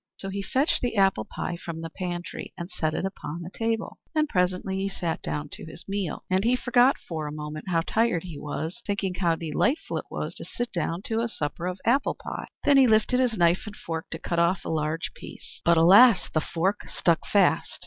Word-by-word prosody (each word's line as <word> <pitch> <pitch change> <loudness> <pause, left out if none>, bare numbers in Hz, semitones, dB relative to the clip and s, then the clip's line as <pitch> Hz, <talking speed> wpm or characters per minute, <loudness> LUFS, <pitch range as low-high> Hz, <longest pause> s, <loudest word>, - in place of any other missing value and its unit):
So 195 - -5
he 200 +1 -3
fetched 265 - +1
the 245 -2 -1
apple 195 - +3
pie 175 - -4
from 170 -1 -6
the 165 0 -6
pantry, 175 -1 -5
and 175 +2 -6
set 155 -1 -1
it - - -1
upon 175 -3 -5
the 175 - -8
table; 225 +1 -2 0.2
and 310 0 +3
presently 185 -3 0
he 195 +1 -1
sat 175 -4 -3
down 75 -1 -3
to - - -8
his 165 +1 -11
meal. 195 -4 -3
And 190 +1 +1
he 240 +2 +3
forgot 245 +2 +4
for 160 -3 -5
a - - -5
moment 150 0 -6
how 165 -2 +2
tired 220 -1 +1
he 165 -5 -7
was, 160 +8 -4
thinking 200 -2 -1
how 175 -2 +1
delightful 165 - 0
it - - -10
was - - -4
to - - -7
sit 240 0 -4
down 170 +1 -2
to 225 0 -1
a 235 - -1
supper 170 -2 -3
of 180 +1 -4
apple 265 +4 +2
pie. - - -6 0.2
Then 285 -1 +5
he 265 -2 +7
lifted 220 +3 +3
his 245 -4 +1
knife 175 +4 +3
and 210 - -7
fork 165 -4 -5
to - - -5
cut 170 - -2
off 170 +2 +2
a - - -3
large 155 0 -1
piece; - - -11
but 170 0 +4
alas, 195 +5 +7
the 155 - +2
fork 185 +6 -1
stuck 170 -2 +2
fast. 200 -2 +3
185 Hz, 220 wpm, -26 LUFS, 165-220 Hz, 0.2 s, he